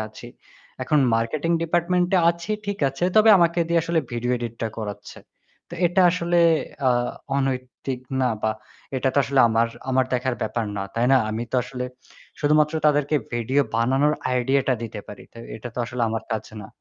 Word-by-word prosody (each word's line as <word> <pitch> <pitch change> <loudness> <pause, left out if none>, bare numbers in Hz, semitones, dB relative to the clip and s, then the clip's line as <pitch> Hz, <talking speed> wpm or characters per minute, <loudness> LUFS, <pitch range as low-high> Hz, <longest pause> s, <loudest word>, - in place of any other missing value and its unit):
আছি। 115 +2 -12 0.5
এখন 150 +3 +2 0.2
marketing 140 +8 -1
department 175 +2 +1
এ - - +5
আছি, 170 +4 -7 0.2
ঠিক 200 0 -3
আছে। 135 +6 -3
তবে 215 +1 +6
আমাকে 170 0 +2
দিয়ে 170 0 +3
আসলে 165 0 +1
ভিডিও 120 +1 -2
এডিটটা 115 -1 -4
করাচ্ছে। 105 -2 -7 0.5
তো - - -8
এটা 180 +2 +3
আসলে 175 0 0 0.5
আ - - +4 0.5
অনৈতিক 130 -1 -3 0.2
না 130 - +2
বা 110 - +2 0.5
এটা 130 +1 +1
তো - - +3
আসলে 135 0 +2
আমার 115 +1 +2 0.2
আমার 130 0 +3
দেখার 125 0 0
ব্যাপার 110 +1 -2
না। 100 - -2
তাই 120 +1 +1
না? - - +7
আমি 110 +2 -3
তো - - +1
আসলে 125 0 -5 0.6
শুধুমাত্র 150 +1 +3
তাদেরকে 145 0 +2 0.2
ভিডিও 125 +4 +1
বানানোর 135 +6 +2 0.2
আইডিয়াটা 130 +1 +1
দিতে 110 -2 -6
পারি। 105 - -10
তো - - -13 0.2
এটা 120 +2 -7
তো - - -6
আসলে 120 0 -4
আমার 110 0 -3
কাজ 110 -1 -2 0.2
না। - - -9
130 Hz, 175 wpm, -23 LUFS, 115-155 Hz, 0.6 s, না